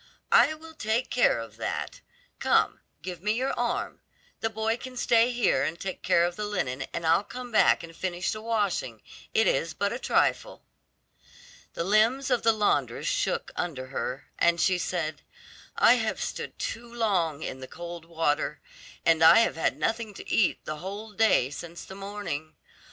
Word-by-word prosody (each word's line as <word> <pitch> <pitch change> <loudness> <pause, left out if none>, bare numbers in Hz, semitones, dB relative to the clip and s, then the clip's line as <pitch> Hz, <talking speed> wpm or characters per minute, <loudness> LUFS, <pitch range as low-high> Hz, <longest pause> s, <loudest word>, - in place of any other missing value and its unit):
"I 310 - +6
will 320 +1 -13
take 220 -2 -1
care 245 - +4
of 115 -1 -8
that. - - -4 0.4
Come, - - +2 0.2
give 180 -2 -6
me 210 +2 +1
your 255 +4 -1
arm. 240 0 -2 0.4
The 225 - 0
boy 220 +1 -1
can 255 0 -9
stay 235 0 +4
here 240 - +2
and 160 +5 -2
take 190 -1 -5
care 170 - +3
of 175 0 -3
the 210 +1 -3
linen, 140 -10 -2
and 170 - -4
I'll 165 +4 +4
come 245 +3 -8
back 215 - +4
and 165 0 -10
finish 180 -1 -2
the 215 - -5
washing; 205 - -1 0.3
it 220 - +5
is 165 0 +1
but 200 +1 0
a 240 - -4
trifle." - - 0 1.1
The - - -1
limbs 225 +8 +2
of 245 - +3
the 230 - +5
laundress 215 -2 0
shook - - -1
under 140 -7 -3
her, 135 +1 -4
and 170 0 +3
she 185 +1 +3
said, 160 -4 -2 0.5
"I - - +6
have - - -1
stood - - -5
too 235 +1 -5
long 180 -10 0
in 130 - -5
the 130 - -8
cold 170 +1 -8
water, 165 -3 -1 0.5
and 165 -1 +4
I 165 +8 +9
have - - +1
had 165 - 0
nothing 225 -2 -2
to - - -10
eat 210 - +1
the 155 - -4
whole 200 +6 -7
day 210 - +3
since 170 +3 -8
the - - -10
morning. 195 -6 -5
195 Hz, 180 wpm, -27 LUFS, 165-225 Hz, 1.1 s, I